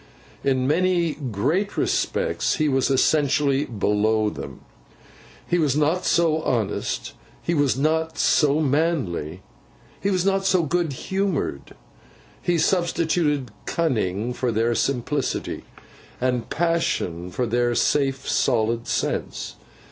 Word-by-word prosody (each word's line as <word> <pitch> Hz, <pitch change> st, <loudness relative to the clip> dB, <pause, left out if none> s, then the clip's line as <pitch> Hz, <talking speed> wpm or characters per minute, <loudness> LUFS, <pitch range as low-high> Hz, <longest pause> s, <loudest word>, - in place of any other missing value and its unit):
In 130 Hz, -2 st, +1 dB
many 170 Hz, +2 st, +2 dB
great 145 Hz, -, -1 dB
respects -, -, 0 dB
he 155 Hz, -, +1 dB
was 135 Hz, -1 st, +1 dB
essentially 140 Hz, 0 st, +2 dB
below 105 Hz, -1 st, +1 dB
them. -, -, -8 dB, 0.9 s
He 175 Hz, -, +1 dB
was 145 Hz, -4 st, +2 dB
not 155 Hz, +5 st, +1 dB
so 160 Hz, -2 st, +2 dB
honest, 110 Hz, -8 st, -2 dB, 0.3 s
he 170 Hz, -, 0 dB
was 145 Hz, -5 st, +2 dB
not 160 Hz, +3 st, 0 dB
so 150 Hz, -1 st, +3 dB
manly, 130 Hz, -, -1 dB, 0.6 s
he 200 Hz, -, 0 dB
was 185 Hz, -2 st, +1 dB
not 195 Hz, 0 st, +2 dB
so 185 Hz, -2 st, +3 dB
good 170 Hz, 0 st, 0 dB
humoured; 185 Hz, -, -2 dB, 0.7 s
he 175 Hz, -1 st, +1 dB
substituted 160 Hz, -, +1 dB, 0.2 s
cunning 120 Hz, -, -1 dB
for 125 Hz, -1 st, -1 dB
their 115 Hz, +2 st, +1 dB
simplicity, 135 Hz, +4 st, -2 dB, 0.5 s
and 125 Hz, -2 st, -1 dB
passion 155 Hz, -, -1 dB
for 125 Hz, +7 st, -2 dB
their 120 Hz, +1 st, +1 dB
safe 135 Hz, 0 st, +1 dB
solid 115 Hz, -2 st, +1 dB
sense. -, -, -2 dB
145 Hz, 115 wpm, -23 LUFS, 120-165 Hz, 0.9 s, so